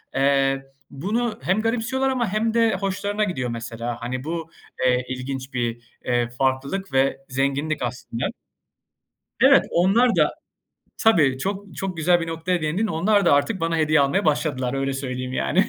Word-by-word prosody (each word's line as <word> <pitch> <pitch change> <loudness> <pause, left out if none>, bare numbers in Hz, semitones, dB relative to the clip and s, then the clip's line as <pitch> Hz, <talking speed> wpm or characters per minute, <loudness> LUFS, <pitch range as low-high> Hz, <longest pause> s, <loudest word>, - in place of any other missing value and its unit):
eee, 135 0 +2 0.3
bunu 215 - -2
hem 195 +4 +1
garipsiyorlar 245 +4 0
ama 250 -3 0
hem 220 +1 +1
de 230 -3 +3
hoşlarına 200 +2 -1
gidiyor 135 -11 -2
mesela. 115 +1 -5
Hani, 125 +2 -4
bu, 165 +1 -4 0.4
eee, 125 0 +2
ilginç 130 +1 -5
bir, 120 -2 -2 0.2
eee, 120 -1 +1
farklılık 135 +9 -2
ve 135 +1 +2
zenginlik 140 +3 -1
aslında. 120 -1 -4 1.2
Evet, - - +6
onlar 220 +8 +3
da - - +4 0.7
Tabii, 155 - +4
çok 195 +2 -4
çok 190 -2 -3
güzel 175 +2 +3
bir 165 - -3
noktaya 165 +2 -1
değindin. 175 +9 0
Onlar 200 +3 +2
da - - +6
artık 175 +8 +2
bana 165 0 0
hediye 155 -1 +3
almaya 140 +2 +2
başladılar, 140 -4 0
öyle 135 0 -1
söyleyeyim, 130 -1 -4
yani. 65 - +1
155 Hz, 155 wpm, -23 LUFS, 130-195 Hz, 1.2 s, Evet